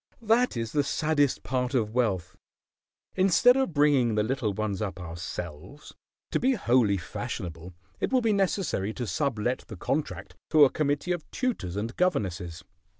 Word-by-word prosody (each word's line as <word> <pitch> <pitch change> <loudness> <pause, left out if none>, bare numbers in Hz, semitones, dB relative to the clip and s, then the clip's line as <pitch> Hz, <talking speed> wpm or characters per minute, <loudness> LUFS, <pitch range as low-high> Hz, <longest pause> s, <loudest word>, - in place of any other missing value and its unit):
"That 225 - +2
is 115 -1 -3
the 145 - +2
saddest 145 -1 +1
part 130 0 -1
of 110 -3 0
wealth. 105 -8 0 0.8
Instead 195 +7 +5
of 265 -7 +1
bringing 140 -6 +3
the 105 - +2
little 120 -2 -1
ones 105 0 -3
up 95 -3 -3
ourselves, 85 - -7 0.4
to - - +1
be 265 +1 +3
wholly 120 - +3
fashionable 85 +1 -6 0.2
it - - -1
will 260 -1 +3
be 225 -2 +2
necessary 185 - 0
to 125 - -3
sublet 120 +4 -1
the 110 -7 -9
contract 95 - -3
to 155 -2 +7
a 130 - +1
committee 145 +3 -1
of 175 -3 -3
tutors 230 - -2
and 110 +4 -3
governesses. 95 - -1
125 Hz, 155 wpm, -27 LUFS, 95-155 Hz, 0.8 s, to